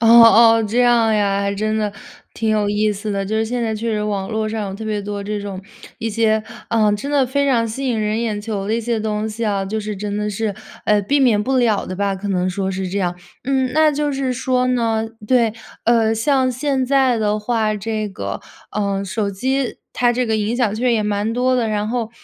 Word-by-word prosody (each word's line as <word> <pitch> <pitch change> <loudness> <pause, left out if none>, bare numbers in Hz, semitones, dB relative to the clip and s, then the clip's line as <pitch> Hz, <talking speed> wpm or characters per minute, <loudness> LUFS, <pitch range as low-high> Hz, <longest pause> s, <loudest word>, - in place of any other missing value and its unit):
哦 230 - +2
哦， 230 0 +8
这 220 +3 0
样 235 -3 +4
呀， 200 -1 +1
还 200 0 -1
真 215 +2 -1
的， 210 -1 0 0.4
挺 225 -1 -1
有 210 -1 +1
意 210 +1 +1
思 205 +1 -5
的。 195 -1 -1
就 215 +3 -3
是 220 - +1
现 245 +1 -2
在 220 -1 -1
确 230 +2 -2
实 210 -1 -1
网 200 -2 -2
络 220 -1 -1
上 215 -2 -3
有 190 - -6
特 220 +2 -7
别 215 -1 -2
多 205 0 -5
这 210 0 -3
种， 195 -2 -6 0.4
一 225 0 -2
些， 220 0 +2 0.3
呃 215 -2 +3
真 240 +8 -3
的 280 -2 +3
非 280 +2 0
常 235 -3 +2
吸 265 +5 -4
引 230 -3 0
人 215 +1 0
眼 215 -3 -1
球 205 -2 -4
的 220 - +1
一 235 - 0
些 230 -1 -1
东 215 0 -2
西 220 +2 -5
啊， 200 -2 0
就 215 +3 -3
是 210 -1 -5
真 205 +1 -4
的 210 0 -1
是， 210 -1 -2 0.3
呃， 210 -1 +3
避 280 +9 +1
免 230 -6 +3
不 265 +3 0
了 225 -5 +2
的 185 - -5
吧， 200 0 0
可 195 +2 -5
能 185 -1 0
说 190 +1 -2
是 190 0 -3
这 200 - -1
样。 175 -2 -1 0.3
嗯， 265 -1 +1
那 310 +2 +4
就 295 0 -1
是 265 -2 -1
说 255 0 0
呢 230 -3 +1 0.2
对， 230 -3 +3 0.3
呃， 225 -1 +3
像 260 +3 +2
现 265 +1 0
在 265 -2 +3
的 215 -1 0
话， 215 -1 0
这 215 +1 -3
个， 195 - -5 0.3
呃， 200 -2 -1
手 200 +1 -2
机 260 +6 -1 0.2
它 240 -1 +3
这 250 0 0
个 220 - +1
影 215 +2 -1
响 235 -5 +1
确 235 +3 -3
实 245 - +3
也 220 -2 +1
蛮 210 +1 -1
多 255 +1 +2
的。 235 - +1
然 210 0 -1
后， 230 -2 -2
220 Hz, 255 characters per minute, -19 LUFS, 205-240 Hz, 0.4 s, 哦